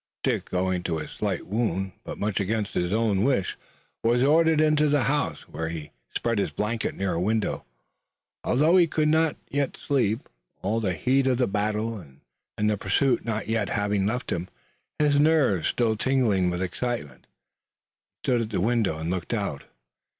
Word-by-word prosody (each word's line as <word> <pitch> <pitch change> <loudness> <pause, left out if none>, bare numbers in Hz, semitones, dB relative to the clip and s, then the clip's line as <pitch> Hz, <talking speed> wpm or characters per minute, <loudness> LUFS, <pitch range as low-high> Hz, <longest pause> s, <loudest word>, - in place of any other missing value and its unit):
Dick, - - -1
owing 90 0 0
to 85 -2 -2
his 75 - -6
slight 100 -4 -2
wound, 95 -3 -1
but - - -7
much 105 0 -1
against 105 +1 -1
his 90 0 0
wish, 110 0 +1 0.5
was 120 +2 +3
ordered 160 +2 +4
into 150 -1 +4
the 145 -2 +3
house, 145 +2 0
where 80 +2 -4
he 80 -3 -6 0.2
spread 115 -2 0
his - - 0
blankets 110 +2 -2
near 95 -1 -1
a 85 - -1
window, 110 +2 0 0.8
although 155 +8 +4
he 175 -2 +5
could 155 0 +1
not 160 -1 +3
yet 140 -1 -1
sleep, 120 -4 0 0.4
all 105 +4 +1
the 95 -5 -1
heat 130 - +2
of 130 -2 +2
the 125 - +3
battle 105 +2 -1 0.6
and 105 -1 +1
pursuit 135 +2 +2
not 110 -2 -3
yet 110 -2 0
having 100 -2 0
left 120 +3 -2
him. 85 +1 -2 0.5
His 145 -1 +3
nerves 145 - +3
still 115 -2 +1
tingling 110 -7 +2
with 90 +1 -2
excitement, 95 - -4
he - - -25
stood 120 -2 +2
at 110 - -3
the 105 - -1
window 110 -4 +1
and 80 +2 -3
looked 90 +5 -2
out. 100 -10 -3
110 Hz, 170 wpm, -26 LUFS, 95-130 Hz, 0.8 s, he